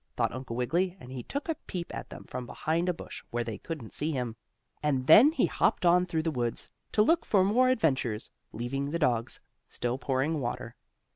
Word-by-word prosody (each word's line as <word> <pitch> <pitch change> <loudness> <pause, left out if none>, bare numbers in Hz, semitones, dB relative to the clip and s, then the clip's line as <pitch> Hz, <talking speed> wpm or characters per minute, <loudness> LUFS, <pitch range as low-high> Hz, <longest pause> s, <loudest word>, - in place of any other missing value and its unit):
thought - - +1
Uncle 130 -2 -5
Wiggily, 175 +10 0
and 125 - -11
he 130 -1 -5
took 280 - -4
a 325 - +1
peep 175 -2 -5
at - - -6
them - - -9
from 125 -1 -6
behind 165 +7 -1
a - - +2
bush - - -8
where 120 0 -1
they 110 -2 -5
couldn't 150 -10 -6
see 155 +2 0
him, 125 -5 -2 0.5
and 140 -4 +1
then 220 - +9
he 325 - +2
hopped - - +1
on 180 +1 +5
through 160 -2 -1
the 165 - 0
woods, 120 -4 -2 0.2
to 210 - +4
look 330 +8 +3
for 195 -3 +3
more 245 +6 +4
adventures, 130 - +1 0.2
leaving 135 +5 -3
the 165 - -1
dogs 120 -7 0 0.3
still 120 +2 -2
pouring 135 +4 0
water. 120 -1 -4
145 Hz, 205 wpm, -29 LUFS, 125-180 Hz, 0.5 s, then